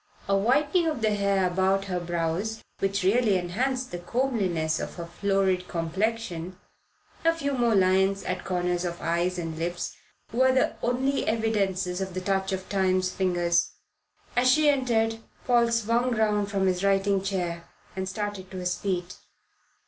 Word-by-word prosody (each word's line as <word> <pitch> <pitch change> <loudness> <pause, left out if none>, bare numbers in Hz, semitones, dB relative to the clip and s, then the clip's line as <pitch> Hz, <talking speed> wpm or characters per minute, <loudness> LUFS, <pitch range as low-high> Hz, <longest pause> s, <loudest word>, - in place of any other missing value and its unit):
A 195 - +3
whitening 285 - +2
of 300 -8 -2
the 215 -1 +3
hair 200 -2 +2
about 190 +2 +1
her 180 -2 -2
brows, 175 +5 -2 0.2
which 195 0 0
really 210 +1 +3
enhanced 250 +9 -2
the 175 - -4
comeliness 185 -8 0
of - - -5
her 170 - -6
florid 190 +1 0
complexion, 180 0 -2 0.7
a 330 - +5
few 280 -4 -2
more 240 -4 +2
lines 190 +1 +3
at 185 0 -3
corners 180 -1 -1
of 175 -1 -4
eyes 175 +2 0
and 165 -2 -4
lips, 175 +1 -3 0.4
were 260 +2 +4
the 260 0 +2
only 260 +3 0
evidences 195 -5 0
of 190 -1 -4
the 185 - -2
touch 190 +1 0
of 190 -1 -3
Time's 185 -1 +1
fingers. 175 -3 +1 0.6
As 250 +1 +4
she 300 +3 +5
entered 225 -5 +1 0.3
Paul 240 -2 +4
swung 230 +2 +1
round 210 -2 +1
from 195 -2 0
his 185 0 +1
writing 195 0 +2
chair 175 -3 -3 0.3
and 190 0 -3
started 205 -2 -4
to 190 - -8
his 180 -1 -1
feet. 180 -2 -3
195 Hz, 155 wpm, -27 LUFS, 180-225 Hz, 0.7 s, a